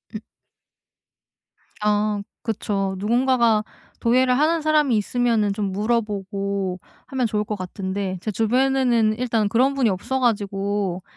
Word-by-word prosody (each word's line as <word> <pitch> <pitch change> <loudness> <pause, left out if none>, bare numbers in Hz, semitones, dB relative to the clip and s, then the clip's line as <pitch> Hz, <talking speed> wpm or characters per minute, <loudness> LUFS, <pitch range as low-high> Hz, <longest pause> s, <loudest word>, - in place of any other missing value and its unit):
으 - - -3 1.6
아 210 0 +1 0.2
그쵸. 195 -4 -2
누군가가 235 0 +2 0.4
도예를 250 +2 +3
하는 320 +2 +2
사람이 300 -5 +3
있으면은 225 -1 +1
좀 200 -1 -2
물어보고 200 -3 -2 0.3
하면 260 -3 0
좋을 210 -1 -1
것 210 0 -4
같은데 190 0 -4
제 215 - -3
주변에는 240 0 +2
일단 225 -4 0
그런 260 +5 +3
분이 260 -5 +2
없어 240 +8 -2
가지고 200 -5 -1
215 Hz, 265 characters per minute, -22 LUFS, 200-245 Hz, 1.6 s, 도예를